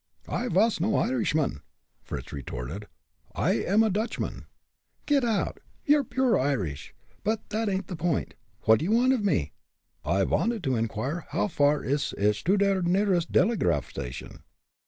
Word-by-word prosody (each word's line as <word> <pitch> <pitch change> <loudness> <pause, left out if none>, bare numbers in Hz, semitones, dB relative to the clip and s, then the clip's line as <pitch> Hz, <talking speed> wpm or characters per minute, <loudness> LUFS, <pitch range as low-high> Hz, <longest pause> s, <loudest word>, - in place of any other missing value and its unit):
"I 250 - -2
vas 215 +2 +2
no 205 +5 +1
Irishman!" 160 - 0 0.4
Fritz - - -7
retorted. 70 +8 -6 0.5
"I - - +1
am 210 +4 +3
a 220 - +2
Dutchman." 215 +5 -3 0.6
"Get 285 -3 +3
out! 225 -4 0 0.3
You're 295 -2 +4
pure 255 -3 +1
Irish. 95 - -2 0.3
But 220 +1 -1
that 220 0 0
ain't 190 0 -1
the 180 - -6
point. 160 -1 -1 0.3
What 110 0 +5
do 155 - -2
you 195 - 0
want 250 +3 +4
of 240 -5 -1
me?" 85 - +1 0.5
"I 95 +4 +1
vanted 225 - 0
to 130 -3 +1
inquire 115 +9 -2
how - - 0
far 145 -3 +2
it 140 +2 -1
ish 105 0 +1
to 195 +4 +3
der 200 -1 +2
nearest 180 -1 +1
delegraph 185 - +2
station?" 60 0 -7
180 Hz, 155 wpm, -27 LUFS, -, 0.6 s, What